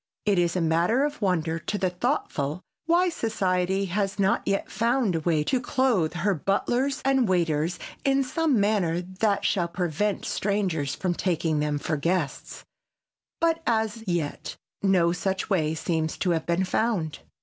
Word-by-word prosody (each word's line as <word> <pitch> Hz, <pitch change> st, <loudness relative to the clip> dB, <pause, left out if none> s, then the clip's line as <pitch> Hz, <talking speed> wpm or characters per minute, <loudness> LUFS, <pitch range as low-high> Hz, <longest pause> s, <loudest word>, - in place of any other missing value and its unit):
It 200 Hz, -3 st, +3 dB
is 175 Hz, 0 st, +1 dB
a 180 Hz, -, +1 dB
matter 170 Hz, -, +2 dB
of 295 Hz, -3 st, -5 dB
wonder 165 Hz, -4 st, 0 dB
to 205 Hz, -, -3 dB
the 185 Hz, -2 st, 0 dB
thoughtful 180 Hz, -, -2 dB, 0.2 s
why 350 Hz, +2 st, +4 dB
society 190 Hz, -, 0 dB
has 195 Hz, +2 st, -1 dB
not 195 Hz, -1 st, +2 dB
yet 195 Hz, 0 st, -1 dB
found 235 Hz, -3 st, +1 dB
a 165 Hz, -, 0 dB
way 160 Hz, -1 st, +1 dB
to 250 Hz, -, 0 dB
clothe 245 Hz, -11 st, +1 dB
her 195 Hz, +4 st, +1 dB
butlers 240 Hz, -, 0 dB
and 265 Hz, -5 st, +3 dB
waiters 170 Hz, -1 st, +1 dB, 0.3 s
in 275 Hz, 0 st, +3 dB
some 280 Hz, -1 st, +1 dB
manner 195 Hz, -5 st, +1 dB
that 195 Hz, +3 st, -1 dB
shall 175 Hz, -4 st, +1 dB
prevent 180 Hz, +4 st, -1 dB
strangers 185 Hz, -9 st, -1 dB
from 185 Hz, -2 st, -1 dB
taking 165 Hz, -4 st, 0 dB
them 150 Hz, 0 st, 0 dB
for 155 Hz, +2 st, -2 dB
guests, 165 Hz, -1 st, -2 dB, 0.7 s
but 330 Hz, 0 st, +2 dB
as 220 Hz, -1 st, 0 dB
yet 170 Hz, -5 st, -2 dB, 0.3 s
no 185 Hz, -4 st, +3 dB
such 190 Hz, +3 st, -2 dB
way 160 Hz, -4 st, +1 dB
seems 160 Hz, -1 st, -1 dB
to 180 Hz, -, 0 dB
have 160 Hz, -2 st, -1 dB
been 170 Hz, +2 st, +1 dB
found. 185 Hz, -5 st, -1 dB
185 Hz, 160 wpm, -26 LUFS, 165-220 Hz, 0.7 s, why